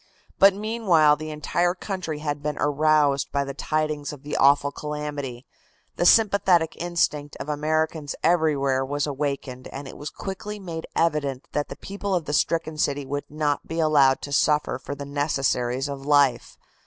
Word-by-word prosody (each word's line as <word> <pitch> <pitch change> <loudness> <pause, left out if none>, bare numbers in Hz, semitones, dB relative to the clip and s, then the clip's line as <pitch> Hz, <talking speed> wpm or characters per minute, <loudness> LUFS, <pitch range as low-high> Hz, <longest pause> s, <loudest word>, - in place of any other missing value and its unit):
But 195 0 +7
meanwhile 200 -8 +3
the 155 +1 -7
entire 175 +4 0
country 185 -5 -4
had 145 -1 -2
been 150 0 -3
aroused 145 -1 +2
by 140 0 0
the 140 0 -5
tidings 155 0 -2
of 145 -2 -11
the 145 - -4
awful 140 +1 +4
calamity, 145 -4 -5 0.5
the 175 - +2
sympathetic 190 -7 +4
instinct 165 -4 -1
of - - -7
Americans 155 0 -1
everywhere 145 -6 +2
was 145 +2 -1
awakened, 140 -3 -4
and 140 0 -8
it - - -10
was 145 - -5
quickly 205 +2 -6
made 170 -5 -6
evident 145 -5 0
that 145 - -2
the - - -6
people 200 0 -4
of 170 -3 -1
the 145 - -4
stricken 160 0 0
city 145 -2 0
would 145 +2 -4
not 150 -1 -1
be 165 - -4
allowed 145 -4 +4
to 145 - -6
suffer 150 -2 +2
for 140 +2 -6
the 140 0 -7
necessaries 135 -3 0
of 140 -1 -6
life. 140 -4 +2
150 Hz, 165 wpm, -24 LUFS, 140-160 Hz, 0.5 s, But